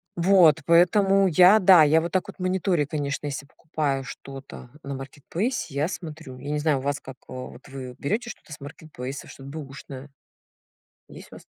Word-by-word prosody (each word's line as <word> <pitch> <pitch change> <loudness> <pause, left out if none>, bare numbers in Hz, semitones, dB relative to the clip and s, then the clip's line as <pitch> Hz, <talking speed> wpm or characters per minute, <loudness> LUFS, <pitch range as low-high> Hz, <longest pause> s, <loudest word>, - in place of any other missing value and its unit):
Вот 170 -3 +5
поэтому 195 +3 +4
я- 180 +4 +7
да, 185 -3 +7
я 155 +2 +5
вот 170 +1 -4
так 185 0 0
вот - - -10
мониторю, 185 -4 0
конечно, 145 -1 -3
если 140 0 -5
покупаю 145 -3 -3
что-то 135 -1 -10
на 140 - -5
маркетплейсе- 150 - -4
я 145 +3 0
смотрю. 160 -7 -8
Я 140 +3 -6
не 150 - 0
знаю, 150 -1 +2
у - - -7
вас 140 +1 -2
как, 130 -1 -11
вот 130 0 -9
вы 130 -2 -8
берёте 220 +10 -2
что-то 160 - -10
с - - -10
маркетплейса, 140 -2 -8
что-то 135 0 -11
б/ушное. 140 -2 -9 1.0
Есть - - -12
у - - -10
вас? - - -13
150 Hz, 175 wpm, -25 LUFS, 135-175 Hz, 1.0 s, я